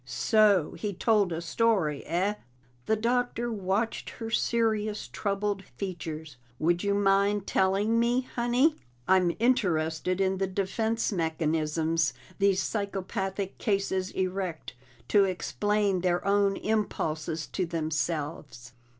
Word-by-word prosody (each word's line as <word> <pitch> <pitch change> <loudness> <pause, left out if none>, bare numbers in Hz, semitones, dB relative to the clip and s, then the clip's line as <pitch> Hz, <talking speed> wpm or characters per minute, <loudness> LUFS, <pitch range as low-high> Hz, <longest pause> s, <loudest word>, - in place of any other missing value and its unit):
"So 205 - +3
he 210 -2 -2
told 205 -1 +2
a 165 0 -3
story, 175 -5 +1
eh?" 185 +5 +1 0.5
The 220 - +3
Doctor 240 +1 0
watched 205 +2 -1
her 225 -1 -7
serious, 215 -3 0
troubled 200 -1 -2
features. 160 -8 -6 0.2
"Would 175 +5 +1
you 200 0 +1
mind 200 0 +2
telling 200 +4 +2
me, 240 +2 +2
Honey? 250 +5 +1 0.3
I'm 180 -2 +3
interested 180 -7 +1
in 190 -1 +1
the 195 - +1
defense 220 +5 -1
mechanisms 160 -1 0 0.2
these 195 -1 +3
psychopathic 195 -1 -3
cases 195 -2 0
erect 185 -5 -3 0.4
to 200 -2 +5
explain 200 +1 0
their 180 -1 0
own 200 0 +2
impulses 165 -7 -2
to 185 -3 -2
themselves." 155 -5 -3
195 Hz, 115 wpm, -28 LUFS, 170-210 Hz, 0.5 s, to